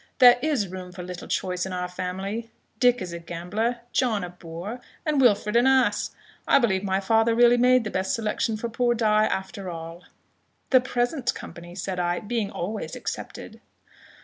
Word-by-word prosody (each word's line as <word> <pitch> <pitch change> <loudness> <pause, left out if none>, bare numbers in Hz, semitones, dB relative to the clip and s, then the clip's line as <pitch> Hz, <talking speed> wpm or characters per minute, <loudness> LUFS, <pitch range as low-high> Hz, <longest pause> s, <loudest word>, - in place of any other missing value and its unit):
"There 245 -2 +8
is 280 -9 +1
room 185 0 -8
for 180 0 -8
little 180 0 -7
choice 180 -1 -1
in 190 - -4
our 180 0 -2
family; 190 +5 -4 0.3
Dick 245 -4 +4
is 175 -2 -6
a 170 - -5
gambler, 205 +8 -3
John 220 -6 +1
a 175 - -5
boor, 180 +7 -7 0.2
and 300 -3 +2
Wilfred 210 -3 +3
an 240 +2 +5
ass. 265 -1 +3 0.4
I - - +6
believe 200 -7 +2
my 190 -1 +1
father 225 +3 +3
really 240 0 +6
made 250 0 +5
the 215 - -4
best 190 0 0
selection 220 0 -1
for 235 - -3
poor 240 +1 +1
Die, 215 -2 +3
after 190 -1 -3
all." 165 +1 -8 0.7
"The 255 -1 +7
present 250 +2 -1
company," 175 +1 -10
said 185 -1 -3
I, 175 0 0
"being 220 -1 -2
always 210 +5 -4
excepted." - - -7
210 Hz, 175 wpm, -25 LUFS, 180-240 Hz, 0.7 s, There